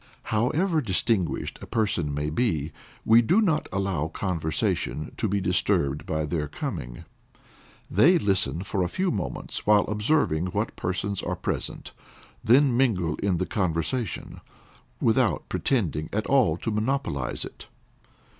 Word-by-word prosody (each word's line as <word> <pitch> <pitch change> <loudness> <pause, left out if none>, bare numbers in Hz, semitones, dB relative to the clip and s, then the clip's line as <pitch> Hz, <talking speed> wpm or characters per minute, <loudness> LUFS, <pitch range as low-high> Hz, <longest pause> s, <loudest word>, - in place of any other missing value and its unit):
However 155 - +2
distinguished 95 - -1
a - - -8
person 100 -9 0
may 75 +1 -2
be, 80 - 0 0.3
we 115 +1 +7
do 175 - +3
not 165 -8 +1
allow 95 -5 -1
conversation 80 -3 -2
to - - 0
be 100 +1 0
disturbed 70 -6 0
by 80 -1 -1
their 75 -1 -2
coming. - - -6 0.8
They 155 - +5
listen 95 - 0
for 100 -1 -2
a 90 - 0
few 185 - 0
moments 100 0 -4
while 105 -1 +5
observing 105 - +1
what 90 - -2
persons 95 +2 -2
are - - -2
present, - - -4 0.5
then 130 +2 +5
mingle 95 -11 +2
in 95 -3 0
the 95 - -1
conversation, 90 - -2 0.6
without - - +2
pretending 80 - 0
at 105 +1 -1
all 125 - +3
to 115 - -3
monopolize 110 - -1
it. - - -11
100 Hz, 135 wpm, -26 LUFS, 80-120 Hz, 0.8 s, we